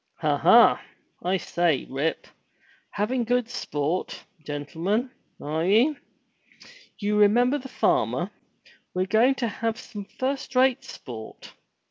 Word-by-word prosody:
Ha, - - +2
ha! - - +6 0.4
I 185 +2 +1
say. 170 -5 0
Rip: 140 +5 -2 0.6
*Havin' 235 +5 -1
good 245 0 +1
sport, 155 - -3 0.2
gentlemen, 165 - -2 0.3
are 155 +2 -2
ye?' 225 - +4 1.0
You 210 0 0
remember 245 +7 +4
the 265 0 -10
farmer! - - 0 0.6
We're 185 0 +1
going 225 +7 +3
to 245 -3 -1
have 225 +1 -2
some 205 -2 -8
first 265 +4 -4
rate 260 +1 +3
sport. 115 -4 -10
210 Hz, 115 wpm, -25 LUFS, 170-250 Hz, 1.0 s, ha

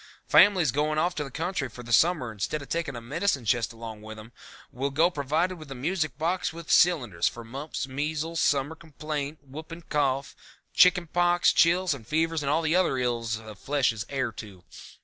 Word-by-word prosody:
Families 185 -9 +5
going 150 +3 0
off 175 +3 +1
to 155 - -3
the 140 - -7
country 165 -1 -3
for 125 +2 -11
the 115 0 -4
summer 155 -4 +3
instead 110 +8 -3
of - - -14
taking 165 -5 -2
a 120 - -6
medicine 140 +1 -1
chest 115 +2 +1
along 115 -2 -9
with 110 0 -9
them 110 +2 -12 0.4
will 135 +3 -2
go 160 +6 +2
provided 160 +5 -1
with 155 -2 -11
a 135 - -6
music 155 +4 -2
box 170 +4 -1
with 165 -1 -7
cylinders 120 - +3
for 120 - -5
mumps, 135 +5 -5
measles, 155 +4 -3
summer 140 +2 +1
complaint, 150 -2 -6
whooping 160 +5 -9
cough, 140 -2 0 0.4
chicken 180 -1 +5
pox, 175 +1 +3
chills 175 +1 +3
and 115 -6 -10
fever 165 +3 +1
and 155 -3 -2
all 160 +3 +1
the 160 +2 +1
other 180 -7 +2
ills 120 -3 -1
the 110 -1 -10
flesh 140 +5 +1
is 110 -1 -5
heir 130 -4 -1
to. 100 -4 -11
145 Hz, 195 wpm, -27 LUFS, 125-165 Hz, 0.4 s, Families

